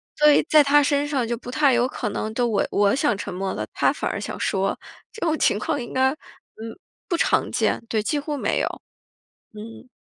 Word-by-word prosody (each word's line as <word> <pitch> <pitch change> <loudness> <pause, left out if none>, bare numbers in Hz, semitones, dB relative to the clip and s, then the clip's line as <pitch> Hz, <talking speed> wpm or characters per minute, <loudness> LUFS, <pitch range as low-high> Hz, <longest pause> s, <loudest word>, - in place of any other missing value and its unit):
所 300 0 +5
以 - - +5
在 305 -1 +7
他 290 +1 +4
身 285 0 +1
上 275 -5 -1
就 235 0 -2
不 245 +1 -9
太 280 0 +3
有 240 0 +3
可 - - -4
能 215 +1 -4
都 245 +1 0
我 215 -3 +1
我 200 +2 +2
想 285 -7 +1
沉 200 -1 -6
默 190 +1 -3
了， - - -4
他 - - +2
反 - - -3
而 - - -3
想 - - -6
说。 195 -1 -1 0.3
这 445 - -7
种 315 -1 +1
情 205 - +2
况 290 +6 -2
应 240 - -7
该， 260 0 +3
嗯， 305 - -8 0.9
不 360 - 0
常 335 - +1
见， - - 0
对， 220 -1 0
几 295 +8 -1
乎 295 +1 -4
没 290 - -1
有。 - - 0 0.9
嗯。 225 +4 -10
255 Hz, 240 characters per minute, -23 LUFS, 215-295 Hz, 0.9 s, 在